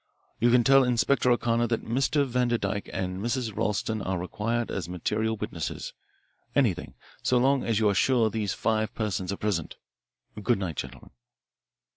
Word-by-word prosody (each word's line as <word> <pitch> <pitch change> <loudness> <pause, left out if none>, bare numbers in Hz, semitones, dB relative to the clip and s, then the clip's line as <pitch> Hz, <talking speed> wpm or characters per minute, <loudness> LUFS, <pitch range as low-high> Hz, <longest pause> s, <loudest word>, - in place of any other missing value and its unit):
You 120 - +4
can 120 0 +5
tell 135 +2 +6
Inspector 125 +1 +2
O'Connor 120 -1 +2
that 115 -1 -2
Mr. 135 +4 +1
Vanderdyke 120 -5 -1
and 95 0 -3
Mrs. 120 -3 -2
Ralston 110 +1 -1
are 95 -1 -2
required 115 +6 -2
as 90 -3 -4
material 110 +5 -1
witnesses - - -5 0.6
anything 110 -11 +1 0.3
so 125 - +2
long 135 +2 +3
as 115 -2 0
you 110 -1 +3
are 100 - +3
sure 125 +3 +3
that 110 - +1
these 105 -4 -1
five 110 -1 0
persons 100 -4 -2
are 100 - -3
present. 95 -7 -2 0.7
Good 120 +3 +2
night, 90 -6 -4
gentlemen." - - -7
110 Hz, 160 wpm, -27 LUFS, 100-120 Hz, 0.7 s, tell